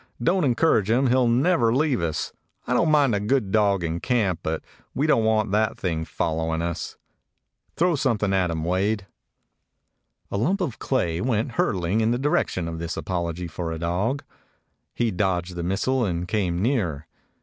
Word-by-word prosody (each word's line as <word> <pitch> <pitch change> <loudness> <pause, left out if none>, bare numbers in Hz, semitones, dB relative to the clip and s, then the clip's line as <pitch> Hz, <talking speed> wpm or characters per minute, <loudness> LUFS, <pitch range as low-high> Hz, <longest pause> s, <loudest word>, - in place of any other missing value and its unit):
Don't 175 +9 +2
encourage 120 -5 +2
him; 125 +3 +3
he - - +4
'll 130 -2 +3
never 125 0 +3
leave 135 - +1
us. 80 -2 -2 0.3
I 125 - -1
don't 155 +6 +3
mind 145 -5 +4
a 100 - +1
good 105 -1 0
dog 100 -4 +2
in 85 +1 -2
camp, 105 -9 0
but 80 0 -3 0.3
we 140 - +1
don't 135 -8 +3
want 110 -2 +2
that 110 +1 +1
thing 80 -3 -2
following 80 0 -1
us. 85 0 -4 0.8
Throw 175 +1 +2
something 115 -9 +1
at 95 -2 +2
him, 80 -1 -2
Wade." 95 +4 0 1.3
A - - -1
lump 170 - +1
of 165 - -3
clay 85 -11 0
went 120 -1 0
hurtling 100 -2 0
in 110 - +2
the 120 - +1
direc 145 +4 +1
tion 85 -3 -4
of 80 0 -5
this 85 0 -4
apology 85 -1 -3
for 85 0 -4
a 80 - -3
dog. 95 - -1 0.7
He 120 -2 +1
dodged 90 -2 -1
the 85 - -3
missile 100 +9 0
and 90 -4 -2
came 90 -3 0
nearer. 90 - 0
105 Hz, 180 wpm, -24 LUFS, 85-125 Hz, 1.3 s, he